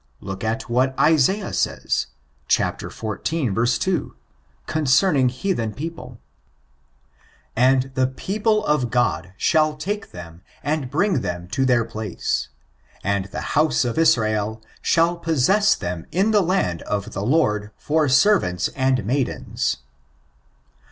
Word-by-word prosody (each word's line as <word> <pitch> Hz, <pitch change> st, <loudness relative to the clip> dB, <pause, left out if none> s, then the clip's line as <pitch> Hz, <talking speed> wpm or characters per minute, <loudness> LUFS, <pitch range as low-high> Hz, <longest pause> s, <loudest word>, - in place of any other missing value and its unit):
Look 95 Hz, 0 st, -7 dB, 0.3 s
what 130 Hz, +2 st, 0 dB
Isaiah 165 Hz, +6 st, +3 dB
says, -, -, -1 dB, 0.4 s
ch. -, -, +4 dB
xiv. 120 Hz, 0 st, -2 dB
2, 185 Hz, -2 st, -1 dB, 0.5 s
concerning 145 Hz, -2 st, +3 dB
heathen 125 Hz, -, -2 dB
people: 165 Hz, +3 st, -7 dB, 0.7 s
'* -, -, -35 dB, 0.2 s
And 135 Hz, 0 st, 0 dB
the 130 Hz, -1 st, +2 dB
pef>ple, 210 Hz, -, -1 dB
[of 135 Hz, -5 st, +1 dB
God] 90 Hz, -8 st, 0 dB
shall 155 Hz, -2 st, +2 dB
take 205 Hz, +7 st, -4 dB
them 85 Hz, -1 st, -11 dB, 0.2 s
and 145 Hz, -3 st, -1 dB
bring 170 Hz, 0 st, +1 dB
them 85 Hz, 0 st, -4 dB
to 135 Hz, +5 st, 0 dB
their 120 Hz, -3 st, +3 dB
place; 110 Hz, -3 st, -3 dB, 0.5 s
and 100 Hz, -1 st, 0 dB
the 100 Hz, -, -6 dB
house 150 Hz, -3 st, +2 dB
of 120 Hz, +5 st, -1 dB
Israel 110 Hz, -7 st, +2 dB, 0.2 s
shall 170 Hz, +1 st, +2 dB
possess 170 Hz, +6 st, +3 dB
them 85 Hz, -1 st, -5 dB
in 195 Hz, +6 st, +2 dB
the 210 Hz, -2 st, +4 dB
land 175 Hz, -, 0 dB
of 100 Hz, -2 st, -4 dB
the 100 Hz, -, -3 dB
Lord 105 Hz, -6 st, +1 dB
for 155 Hz, -1 st, +1 dB
servants 135 Hz, -, +3 dB
and 130 Hz, -4 st, 0 dB
maidens." 125 Hz, -, -1 dB
130 Hz, 125 wpm, -22 LUFS, 110-165 Hz, 0.7 s, ch